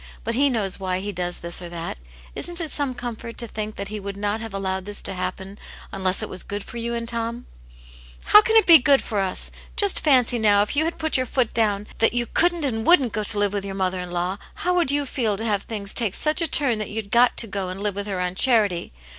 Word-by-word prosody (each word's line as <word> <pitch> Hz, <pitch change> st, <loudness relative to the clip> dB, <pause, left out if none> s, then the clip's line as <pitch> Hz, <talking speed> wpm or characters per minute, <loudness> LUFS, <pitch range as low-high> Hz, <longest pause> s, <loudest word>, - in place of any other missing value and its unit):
But 230 Hz, -, -2 dB
He 280 Hz, +4 st, +2 dB
knows 205 Hz, -7 st, -2 dB
why 185 Hz, -1 st, -2 dB
He 205 Hz, +2 st, -4 dB
does 175 Hz, -1 st, -1 dB
this 170 Hz, +1 st, -1 dB
or 175 Hz, -, -7 dB
that. 170 Hz, -, -6 dB, 0.3 s
Isn't 345 Hz, 0 st, +2 dB
it 320 Hz, -4 st, -4 dB
some 280 Hz, -3 st, -1 dB
comfort 235 Hz, -1 st, -7 dB
to 240 Hz, -, -3 dB
think 215 Hz, -1 st, -5 dB
that 200 Hz, 0 st, -6 dB
He 215 Hz, 0 st, -5 dB
would 200 Hz, 0 st, -7 dB
not 205 Hz, +2 st, -2 dB
have 225 Hz, -1 st, -7 dB
allowed 190 Hz, -1 st, -3 dB
this 205 Hz, 0 st, -1 dB
to -, -, -1 dB
happen 190 Hz, +2 st, -6 dB, 0.3 s
unless 190 Hz, -1 st, 0 dB
it -, -, -3 dB
was 185 Hz, -, -1 dB
good 205 Hz, 0 st, -5 dB
for 240 Hz, -, -9 dB
you 235 Hz, 0 st, -2 dB
and 230 Hz, 0 st, -4 dB
Tom 235 Hz, +1 st, -3 dB, 0.3 s
?" -, -, -22 dB
" -, -, -21 dB
How 420 Hz, -, +10 dB
can 445 Hz, +1 st, 0 dB
it 445 Hz, -, +6 dB
be 335 Hz, -3 st, +9 dB
good 275 Hz, +1 st, +3 dB
for 210 Hz, -3 st, -3 dB
us? 190 Hz, -1 st, -3 dB, 0.2 s
Just 400 Hz, -2 st, +2 dB
fancy 250 Hz, -5 st, +3 dB
now, 205 Hz, -2 st, +4 dB
if 210 Hz, -, -5 dB
you 310 Hz, +2 st, +2 dB
had 335 Hz, -, -3 dB
put 315 Hz, -3 st, 0 dB
your 255 Hz, -1 st, -1 dB
foot 245 Hz, -1 st, -1 dB
down 210 Hz, -3 st, 0 dB
that 225 Hz, -, +3 dB
you 240 Hz, 0 st, 0 dB
couldn't 345 Hz, +3 st, +1 dB
and 225 Hz, -5 st, -2 dB
wouldn't 270 Hz, -, +4 dB
go 215 Hz, -, -2 dB
to 210 Hz, +1 st, +3 dB
live 205 Hz, -1 st, +1 dB
with 200 Hz, -1 st, -3 dB
your 195 Hz, -1 st, -6 dB
mother 185 Hz, -1 st, -2 dB
in 180 Hz, 0 st, -6 dB
law, 180 Hz, +3 st, -3 dB, 0.2 s
how 360 Hz, -, -2 dB
you 290 Hz, -2 st, +2 dB
would 280 Hz, -, -6 dB
feel 225 Hz, -6 st, -1 dB
to 225 Hz, -, -4 dB
have 205 Hz, -3 st, 0 dB
things 205 Hz, -3 st, -5 dB
take 225 Hz, -6 st, +3 dB
such 305 Hz, +3 st, 0 dB
a 335 Hz, -, +1 dB
turn 260 Hz, -6 st, +3 dB
that 215 Hz, -, -5 dB
you'd 210 Hz, -1 st, -5 dB
got 240 Hz, +1 st, +3 dB
to -, -, +7 dB
go 195 Hz, -3 st, -4 dB
and 190 Hz, +2 st, -6 dB
live 210 Hz, -1 st, 0 dB
with 200 Hz, +1 st, -5 dB
her 195 Hz, -3 st, -3 dB
on 180 Hz, 0 st, -2 dB
charity? 205 Hz, -5 st, +2 dB
215 Hz, 270 wpm, -22 LUFS, 195-245 Hz, 0.3 s, How